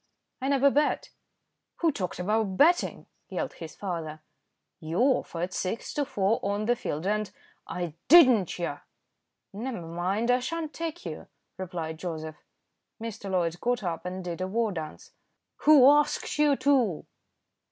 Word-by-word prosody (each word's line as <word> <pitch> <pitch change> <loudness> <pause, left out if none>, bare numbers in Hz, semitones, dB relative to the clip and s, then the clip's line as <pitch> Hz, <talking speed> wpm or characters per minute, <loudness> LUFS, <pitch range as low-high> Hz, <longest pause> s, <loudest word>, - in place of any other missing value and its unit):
"I 265 - -1
never 280 0 +4
bet." 295 +2 +1 0.6
"Who 330 -2 +2
talked 185 -9 -4
about 200 +1 0
betting?" 345 +4 +3 0.2
yelled - - -3
his 165 -2 -9
father. 160 -5 -5 0.6
"You 160 +2 -4
offered 185 -8 +1
six 185 +5 -3
to 290 - 0
four 205 0 +1
on 205 +1 -1
the 240 +2 +3
field, 155 -7 -4
and 210 +1 0 0.2
" - - -36
"I 175 -3 -4
didn't. 255 - +6
Yah!" 175 - -3 0.7
"Never 225 -4 -5
mind; 185 +8 0
I 250 - +3
sha'n't 315 +4 -4
take 330 -8 -5
you," 160 -3 -6 0.3
replied 165 -4 -5
Joseph. 160 -3 -6 0.6
Mr. 220 -3 -6
Loyd 175 -2 0
got 245 -2 0
up 170 -3 -3
and 185 +1 -5
did 175 0 -5
a 185 - -1
war 225 +2 0
dance. 160 -4 -7 0.5
"Who 295 -4 +8
asked 295 +1 +3
you 295 -2 +5
to?" 255 - +2
200 Hz, 150 wpm, -28 LUFS, 175-260 Hz, 0.7 s, Who